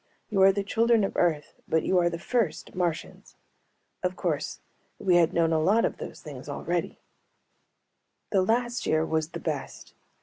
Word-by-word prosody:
You 195 Hz, -2 st, +2 dB
are 195 Hz, 0 st, +8 dB
the 200 Hz, +1 st, -2 dB
children 230 Hz, +2 st, +3 dB
of 195 Hz, -, -2 dB
Earth 155 Hz, -4 st, +1 dB
but 160 Hz, -, +1 dB
you 185 Hz, -, +3 dB
are 175 Hz, 0 st, +3 dB
the 170 Hz, -, -4 dB
first 225 Hz, -1 st, -1 dB
Martians." 175 Hz, -3 st, -3 dB, 0.7 s
Of -, -, -1 dB
course -, -, -2 dB, 0.4 s
we 180 Hz, -2 st, +3 dB
had 165 Hz, -2 st, +4 dB
known 165 Hz, -1 st, +2 dB
a 160 Hz, -, +3 dB
lot 205 Hz, +8 st, +3 dB
of -, -, -2 dB
those -, -, -8 dB
things -, -, -9 dB
already. -, -, -2 dB, 1.3 s
The 195 Hz, -, +3 dB
last 240 Hz, +4 st, 0 dB
year 155 Hz, 0 st, +2 dB
was 160 Hz, -1 st, -1 dB
the -, -, -7 dB
best. 150 Hz, -5 st, -5 dB
180 Hz, 170 wpm, -27 LUFS, 160-205 Hz, 1.3 s, are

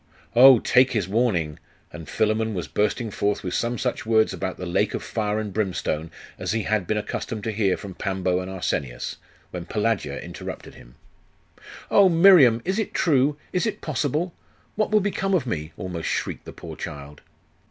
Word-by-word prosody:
'Oh, 130 Hz, +1 st, +9 dB
take 125 Hz, +3 st, +3 dB
his 105 Hz, -6 st, 0 dB
warning....' 95 Hz, -8 st, 0 dB, 0.3 s
And 80 Hz, -2 st, -9 dB
Philammon 110 Hz, 0 st, 0 dB
was 90 Hz, -, -3 dB
bursting 105 Hz, +2 st, -1 dB
forth 100 Hz, +1 st, -1 dB
with 90 Hz, -, -3 dB
some 120 Hz, +1 st, -1 dB
such -, -, -2 dB
words 110 Hz, -1 st, +3 dB
about 95 Hz, -, -4 dB
the 90 Hz, -, -6 dB
lake 85 Hz, -, 0 dB
of -, -, -4 dB
fire 105 Hz, -1 st, -2 dB
and 105 Hz, -3 st, -5 dB
brimstone 90 Hz, -6 st, -2 dB, 0.3 s
as -, -, -2 dB
he 110 Hz, -1 st, -1 dB
had 105 Hz, -4 st, 0 dB
been 110 Hz, -, 0 dB
accustomed 105 Hz, +1 st, -4 dB
to 110 Hz, -, -2 dB
hear 100 Hz, -3 st, +1 dB
from 100 Hz, -2 st, -8 dB
Pambo 95 Hz, -1 st, -1 dB
and 95 Hz, 0 st, -5 dB
Arsenius, 70 Hz, -9 st, -3 dB, 0.3 s
when 90 Hz, -2 st, -6 dB
Pelagia 105 Hz, -10 st, -1 dB
interrupted -, -, -8 dB
him -, -, -16 dB, 1.0 s
'Oh, 200 Hz, -2 st, +6 dB
Miriam! 165 Hz, -, +6 dB
Is 190 Hz, +4 st, 0 dB
it 220 Hz, -, -3 dB
true? 145 Hz, -2 st, +2 dB, 0.2 s
Is 180 Hz, +5 st, +1 dB
it 220 Hz, -, -4 dB
possible? 155 Hz, +3 st, -1 dB, 0.4 s
What 215 Hz, 0 st, 0 dB
will 215 Hz, 0 st, +4 dB
become 195 Hz, -1 st, 0 dB
of 165 Hz, -, 0 dB
me?' 80 Hz, -9 st, -4 dB
almost 90 Hz, -3 st, -4 dB
shrieked -, -, -3 dB
the -, -, -8 dB
poor -, -, -9 dB
child. 70 Hz, 0 st, -8 dB
110 Hz, 180 wpm, -24 LUFS, 90-130 Hz, 1.0 s, Oh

